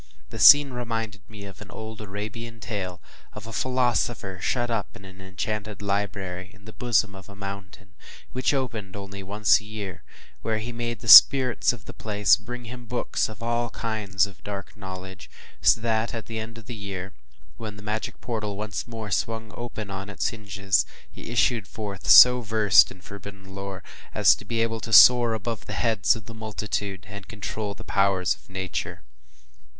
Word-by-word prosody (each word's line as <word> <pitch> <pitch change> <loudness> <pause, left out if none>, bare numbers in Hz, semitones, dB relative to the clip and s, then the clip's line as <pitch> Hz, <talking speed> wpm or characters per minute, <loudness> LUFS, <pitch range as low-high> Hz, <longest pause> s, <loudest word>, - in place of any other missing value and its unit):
The - - -7
scene 145 -1 +8
reminded 115 -4 -4
me 105 -2 -10
of 100 +1 -12
an 105 - -11
old 110 +1 -8
Arabian 110 +3 -7
tale, 100 -5 -5 0.3
of 105 +1 -9
a 115 - -9
philosopher 120 -6 -1
shut 120 +3 -1
up 110 -3 -3
in 100 - -13
an 95 0 -13
enchanted 105 +3 -5
library, 100 -2 -3
in 100 +1 -20
the 110 - -11
bosom 105 -4 +1
of 95 -1 -12
a 100 - -12
mountain, 100 -1 -9 0.4
which 130 0 0
opened 115 -8 -3
only 100 0 -8
once 95 -2 +3
a - - -14
year; 105 -4 -7 0.4
where 110 -1 -1
he 110 +3 -5
made 120 -1 -4
the 115 - -9
spirits 130 +1 +8
of 115 -3 -10
the - - -9
place 105 -1 +3
bring 120 +2 -8
him 120 0 -9
books 125 -2 -1
of 110 +1 -10
all 120 0 -1
kinds 105 -4 -1
of 95 -2 -14
dark 100 -1 -7
knowledge, 95 -2 -9 0.3
so - - +5
that 115 0 -1
at 115 - -6
the 110 -1 -5
end 110 +1 -7
of 115 - -12
the 120 - -7
year, 100 -3 -6 0.4
when 110 -2 -7
the 105 - -12
magic 110 +1 -4
portal 110 -4 -4
once 105 +2 -4
more 110 -3 -7
swung 110 0 -2
open 110 -4 -6
on 95 +1 -6
its 100 - -1
hinges, 100 - 0 0.3
he - - -10
issued 120 -3 +1
forth 100 -3 -7
so 125 0 +9
versed 110 -2 +5
in 95 - -13
forbidden 100 0 -11
lore, 95 -1 -7 0.3
as - - +6
to - - -9
be 115 -1 0
able 115 0 -2
to 110 - -7
soar 120 0 +8
above 110 -1 -5
the - - -5
heads 110 -5 +2
of 110 -2 -9
the 115 - -10
multitude, 105 -3 -4
and 100 -1 -9
to - - -28
control 105 -1 -5
the - - -11
powers 95 -4 +1
of - - -20
Nature. 95 -8 -5
105 Hz, 185 wpm, -25 LUFS, 100-115 Hz, 0.4 s, so